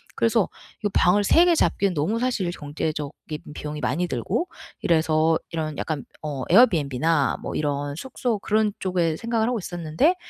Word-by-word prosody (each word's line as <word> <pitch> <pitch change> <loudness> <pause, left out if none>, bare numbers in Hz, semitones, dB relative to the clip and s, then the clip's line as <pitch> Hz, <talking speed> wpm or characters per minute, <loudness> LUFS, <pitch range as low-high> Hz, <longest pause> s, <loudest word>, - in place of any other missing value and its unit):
그래서 225 -3 +2 0.3
이거 205 - -1
방을 200 +3 +4
3 335 - +5
개 350 - +5
잡기엔 200 - +2
너무 165 +9 0
사실 230 -7 0
경제적인 150 0 -4 0.2
비용이 150 0 -6
많이 175 +7 0
들고 185 - -1 0.3
이래서 160 -1 +3
이런 155 -3 -3
약간 155 -4 -3 0.2
어 145 -3 -3
에어비앤비나 160 - +3
뭐 - - -4
이런 145 -1 -1
숙소 245 - -2
그런 210 0 +1
쪽에 175 -4 0
생각을 230 +3 0
하고 245 -3 0
있었는데, 175 - +1
170 Hz, 340 characters per minute, -24 LUFS, 150-220 Hz, 0.3 s, 3